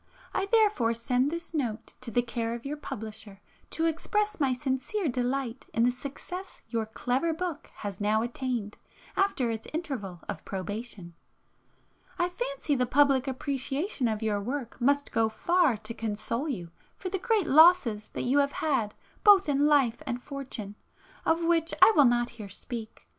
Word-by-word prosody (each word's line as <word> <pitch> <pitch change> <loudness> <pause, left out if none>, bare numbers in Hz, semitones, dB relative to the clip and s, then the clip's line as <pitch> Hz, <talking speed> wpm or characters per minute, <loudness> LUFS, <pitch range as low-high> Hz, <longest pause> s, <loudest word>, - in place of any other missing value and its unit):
I 390 0 0
therefore 405 - +3
send 250 +3 +1
this 335 +2 -5
note 240 -8 -3
to 255 - -1
the 240 +2 +2
care 230 -1 -2
of 235 - -9
your 285 +2 -2
publisher 215 -7 -8 0.3
to 325 - 0
express 420 +6 0
my 275 -3 +2
sincere 265 +9 -1
delight 250 -1 -2
in 230 - +3
the 245 - +4
success 290 +9 -7
your 225 -2 -1
clever 260 +8 0
book 345 -3 -4
has 200 -2 -6
now 215 +2 +2
attained 240 -3 -3 0.4
after 330 -12 +1
its 225 -1 -5
interval 230 - -4
of - - -5
probation. 195 -2 -6 1.0
I 350 -1 +1
fancy - - -2
the 250 -2 +1
public 275 0 +4
appreciation 270 - -1
of 220 0 -2
your 210 -2 0
work 245 +2 -4
must 285 +3 +2
go 225 -1 +2
far 335 +2 +2
to 215 +2 -7
console 225 +6 -3
you 175 -11 -4 0.3
for 370 - -4
the 385 +1 -2
great 440 -2 +2
losses 295 -9 +5
you 265 +4 +2
have 280 0 +2
had 255 -9 0 0.3
both 405 -4 +7
in 290 0 +3
life 275 -6 +3
and 240 - -2
fortune, 250 -7 -6 0.5
of 330 +1 +3
which 330 0 +2
I 445 - +8
will 290 - +7
not 240 0 +2
here 200 - -7
speak. 220 +3 -7
260 Hz, 165 wpm, -28 LUFS, 225-320 Hz, 1.0 s, I